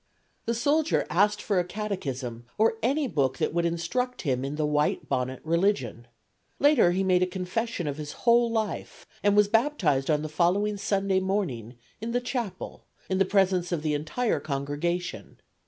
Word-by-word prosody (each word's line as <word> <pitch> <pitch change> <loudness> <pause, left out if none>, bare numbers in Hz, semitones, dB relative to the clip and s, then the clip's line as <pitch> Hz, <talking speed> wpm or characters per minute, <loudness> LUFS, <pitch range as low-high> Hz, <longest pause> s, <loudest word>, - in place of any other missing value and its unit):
The 235 - +1
soldier 295 +6 +2
asked 205 +3 +2
for 200 -3 +1
a - - +2
catechism 135 - -5
or 225 +1 +2
any 275 +5 +1
book 135 - 0
that - - -1
would 170 0 +1
instruct 250 +10 -2
him 130 -4 0
in 140 +2 -3
the 155 0 0
white 150 0 0
bonnet 130 +1 -2
religion. 160 - 0 0.5
Later 285 -10 +5
he 185 +2 +1
made 185 -1 +3
a 185 - +3
confession 185 +2 -3
of 145 0 -3
his 150 -1 -6
whole 235 0 +5
life 220 -3 -3 0.2
and 205 0 +3
was 210 -1 +6
baptized 205 - +1
on 150 -1 +2
the - - -2
following 190 +6 +1
Sunday 195 -1 +1
morning 170 - -2 0.3
in 230 +1 -3
the 245 - +2
chapel 240 -7 -5 0.2
in 190 - +1
the 195 - +4
presence 185 -2 +2
of 165 -3 -1
the 155 -1 0
entire 155 +9 -1
congregation. 150 +5 -3
185 Hz, 170 wpm, -27 LUFS, 150-215 Hz, 0.5 s, was